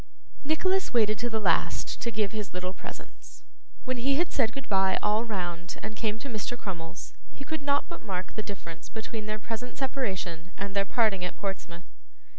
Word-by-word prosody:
Nicholas 370 +2 +2
waited 215 -2 +5
to 240 - +1
the 220 -1 +1
last 175 -6 +2
to 235 - +1
give 210 -3 +1
his 210 -4 -3
little 185 0 -1
presents. - - -10 0.4
When 255 -1 0
he 270 +3 +3
had 340 +3 +2
said 230 -5 +3
goodbye 195 -7 +3
all 210 +2 +4
round 180 -4 -2
and 215 0 -4
came 215 -1 0
to 260 - -6
Mr. 240 0 -2
Crummles, 175 -5 -5 0.2
he 275 - -8
could 315 +2 -2
not 280 0 +3
but 340 - -7
mark 185 -3 -3
the 215 - -1
difference 185 -6 -7
between 220 -1 -4
their 215 0 0
present 225 +3 -5
separation 190 -10 -1
and 200 0 -3
their 200 0 +4
parting 205 -4 +3
at 180 - -2
Portsmouth. 180 -3 -4
215 Hz, 185 wpm, -30 LUFS, 190-245 Hz, 0.4 s, waited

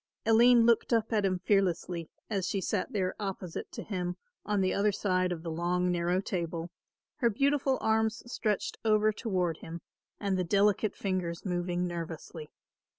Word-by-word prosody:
Aline 230 +1 +6
looked 235 +1 +3
up 225 0 +1
at 210 -2 +2
him 185 -1 +1
fearlessly, 180 -4 0 0.2
as 195 -4 -1
she 200 - 0
sat 190 0 -1
there 185 -3 0
opposite 190 -4 -5
to - - -5
him 180 -3 -3 0.3
on 205 0 0
the 185 -1 +2
other 205 +1 +2
side 185 -2 0
of 165 -2 -4
the 165 - -4
long 180 +2 0
narrow 175 +1 +1
table, 170 -3 -3 0.5
her 240 -4 +3
beautiful 275 +3 +2
arms 220 0 +1
stretched 215 -4 -2
over 215 -1 +3
toward 185 -8 -1
him 165 +1 -8 0.4
and 195 -2 0
the - - +2
delicate 205 +3 +2
fingers 185 -3 -2
moving 175 -1 -1
nervously. 165 -2 -6
190 Hz, 160 wpm, -30 LUFS, 175-215 Hz, 0.5 s, Aline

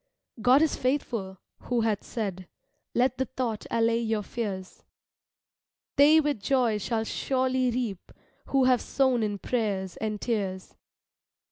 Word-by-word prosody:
God 255 +6 +6
is 320 - +1
faithful, 235 -8 -2 0.3
who 245 -2 +1
hath 220 -3 0
said, 190 -6 -4 0.5
(Let 250 +1 +2
the 265 - +1
thought 245 -5 -3
allay 230 0 +2
your 220 -2 -1
fears,) 195 -4 -5 1.1
"They 300 +3 +7
with 295 -8 0
joy 235 -1 +2
shall 220 +2 -1
surely 260 +2 0
reap, 230 -6 -3 0.4
Who 270 -1 +3
have 255 -1 +4
sown 260 -3 +1
in 210 -2 -1
prayers 200 -5 -2
and 215 -1 -3
tears." 195 -6 -3
230 Hz, 130 wpm, -27 LUFS, 210-255 Hz, 1.1 s, They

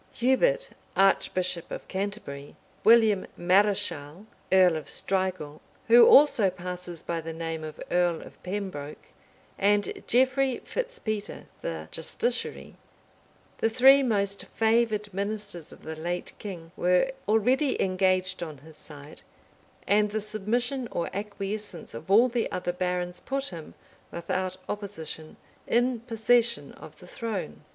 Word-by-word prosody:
Hubert, - - +2 0.2
archbishop 185 -2 +2
of - - -7
Canterbury, 190 -8 -5 0.3
William 220 -3 +5
Mareschal, 185 -3 +1 0.3
earl 185 -3 +6
of 155 -3 -5
Strigul, 185 -6 -2 0.3
who 235 +1 +9
also 270 -9 +6
passes 180 -2 -6
by 170 -1 -2
the 165 +1 -6
name 165 -1 -4
of 155 -1 -8
earl 175 -2 +2
of - - -15
Pembroke, 180 -7 -6 0.5
and 205 +1 +1
Geoffrey 260 +1 +3
Fitz - - -3
Peter, 215 - -4 0.2
the 80 -1 -4
justiciary, 240 +9 -2 0.9
the 225 - +2
three 265 +4 +7
most 200 -5 0
favored 220 -2 +1
ministers 200 -4 -4
of - - -15
the 160 - -6
late 175 +3 -4
king, 170 -5 -8
were 180 +9 +2 0.2
already 250 +6 +2
engaged 185 0 +1
on 155 -4 -5
his 155 +3 -15
side; 145 -1 -11 0.6
and 210 +1 +3
the 215 +1 -2
submission 235 +5 -2
or 170 - -3
acquiescence 200 -2 -5
of 115 +10 -9
all 225 +6 +6
the 240 -2 -1
other 180 -1 -2
barons 180 0 -2
put 275 +5 -3
him, 165 -4 -9 0.3
without 185 +2 -3
opposition, 175 -6 -6 0.3
in 245 +1 +2
possession 235 0 +1
of - - -13
the - - -14
throne. 195 - -5
195 Hz, 130 wpm, -27 LUFS, 175-225 Hz, 0.9 s, who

